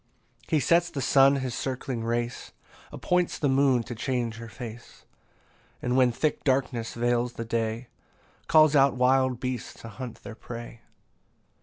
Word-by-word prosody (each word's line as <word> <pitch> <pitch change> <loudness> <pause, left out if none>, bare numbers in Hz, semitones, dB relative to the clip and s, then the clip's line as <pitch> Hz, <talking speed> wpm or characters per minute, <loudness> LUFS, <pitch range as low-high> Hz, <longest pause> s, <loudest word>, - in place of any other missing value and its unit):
15 155 - +2
He - - +3
sets 170 +5 +3
the 140 - -5
sun 135 +1 +5
his 130 -3 -3
circling 130 -2 -4
race, 120 +1 -3 0.4
Appoints 180 -1 0
the 145 - 0
moon 135 -2 +3
to 120 - -7
change 120 -1 -2
her 115 0 -9
face; 115 0 -10 0.7
And 125 0 -1
when 130 -2 +4
thick 150 +6 -1
darkness 130 -4 0
veils 120 0 0
the 115 - -6
day, 115 +1 -2 0.6
Calls 155 -2 +5
out 135 -2 +4
wild 130 0 +2
beasts 125 -3 -5
to 115 - -9
hunt 125 0 -9
their - - -8
prey. 115 0 -9
125 Hz, 155 wpm, -27 LUFS, 115-135 Hz, 0.7 s, sun